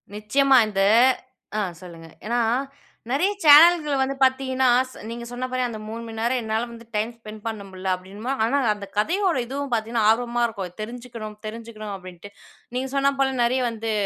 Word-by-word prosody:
நிச்சயமா 265 +6 +3
இந்த 195 -2 -1 0.8
ஆ - - +1 0.2
சொல்லுங்க. 165 -2 -11 0.2
ஏன்னா 240 +2 0 0.7
நிறைய 320 +9 +2
சேனல்களை 300 0 +7
வந்து 270 +1 0
பாத்தீங்கன்னா 260 0 +2 0.2
ஸ் - - -15
நீங்க 235 0 -6
சொன்னா 245 +1 -4
போல 255 0 -1
அந்த 220 - -7
3 230 +1 -6
மணி 225 0 -7
நேரம் 240 +2 0
என்னால 220 +1 -2
வந்து 230 0 -12
டைம் 220 +3 0
ஸ்பெண்ட் 215 -1 -11
பண்ண 220 -2 -4
முடில. 190 0 -7
அப்டின்னம்போ, 200 +8 -6
ஆனா 245 +6 +2 0.2
அந்த 200 -1 -9
கதையோட 350 - +1
இதுவும் 275 +1 -5
பாத்தீங்கன்னா, 225 0 0
ஆர்வமா 240 +1 +1
இருக்கும். 195 -6 -6
தெரிஞ்சிக்கணும், 230 -1 -7
தெரிஞ்சுக்கணும் 215 -1 -7
அப்டின்ட்டு. 185 +1 -11 0.4
நீங்க 260 +1 -2
சொன்னா 275 0 +3
போல 265 -1 +2
நிறைய 255 +2 +1
வந்து 225 0 -4
230 Hz, 165 wpm, -23 LUFS, 215-260 Hz, 0.8 s, சேனல்களை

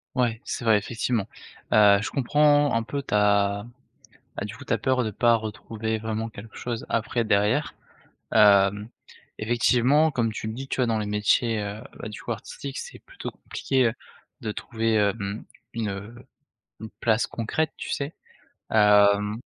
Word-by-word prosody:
Ouais, 120 -3 +1
c'est - - -4
vrai, 110 -2 +5
effectivement, 115 0 -2 0.5
heu, 105 -2 +7
je - - -3
comprends 145 +1 +3
un 115 - +1
peu, 140 +4 -4
tu - - -6
as 100 0 +2 0.7
bah, 100 - -3
du 105 - -7
coup 140 - -11
tu - - -8
as - - +2
peur 130 +3 +1
de 110 - -2
pas 120 +3 +3
retrouver 110 0 -4
vraiment 110 +1 -3
quelque 110 +1 -12
chose 120 -2 -4
après 115 +1 0
derrière, 105 +7 +1 0.6
hem, 100 0 +5 0.5
effectivement 125 +7 +3
comme 115 -5 0
tu 110 - -5
le 110 - -4
dis, 135 +2 -6
tu - - -3
vois 125 - +3
dans 115 -1 0
les 105 - -2
métiers, 105 +2 +1
heu, 105 +1 -5 0.2
bah - - -5
du - - -8
coup - - -3
artistique - - -7
c'est 485 - -8
plutôt - - -8
compliqué, 130 -2 -1
heu, 115 - +1 0.5
de 110 - -3
trouver, 115 0 -1
heu, 100 -1 +3
mmh, 100 0 -5 0.3
une, 115 -2 -2
heu, 100 +4 -7 0.7
une 110 - -8
place 110 0 +2
concrète, 140 +7 -2
tu - - -7
sais? 140 +2 -3 0.6
Hem 105 0 +4
110 Hz, 175 wpm, -25 LUFS, 105-120 Hz, 0.7 s, heu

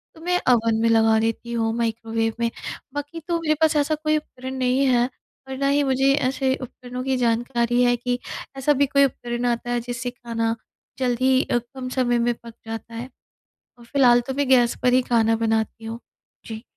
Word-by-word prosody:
तो 320 - -15
मैं 360 +1 +1
अवन 230 -2 +4
में 230 - +3
लगा 225 -1 +4
लेती 225 +1 -2
हूँ, 225 -1 0
माइक्रोवेव 225 -1 -1
में। 235 0 +1 0.4
बाकी 290 +3 -5
तो 340 -1 0
मेरे 310 -2 +2
पास 315 0 +4
ऐसा 295 +1 +2
कोई 310 0 +1
उपकरण 260 -3 -7
नहीं 260 +2 +2
है 245 -1 +3 0.4
और 265 0 -5
ना 275 +1 0
ही 285 +1 +3
मुझे 270 0 +3
ऐसे 265 -1 +1
उपकरणों 250 0 -7
की 265 0 0
जानकारी 240 0 +1
है 245 0 +4
कि 245 +1 -2 0.4
ऐसा 280 +2 +3
भी - - +6
कोई 280 +1 +4
उपकरण 240 -2 -3
आता 240 0 -1
है 240 - +1
जिससे 245 +1 -4
खाना 230 -2 -2 0.4
जल्दी 255 +1 +2
अ, - - 0
कम 255 +2 -6
समय 245 -2 +1
में 240 +1 +2
पक 235 0 -13
जाता 225 +1 -7
है। 240 +3 -6 0.7
और 240 - -15
फिलहाल 245 -1 +4
तो 265 - -2
मैं 280 -1 0
गैस 245 -2 +4
पर 250 - +3
ही 255 - +4
खाना 225 -1 +3
बनाती 220 0 -1
हूँ। 225 +1 -5 0.5
जी। 220 0 -7
245 Hz, 195 wpm, -23 LUFS, 230-265 Hz, 0.7 s, भी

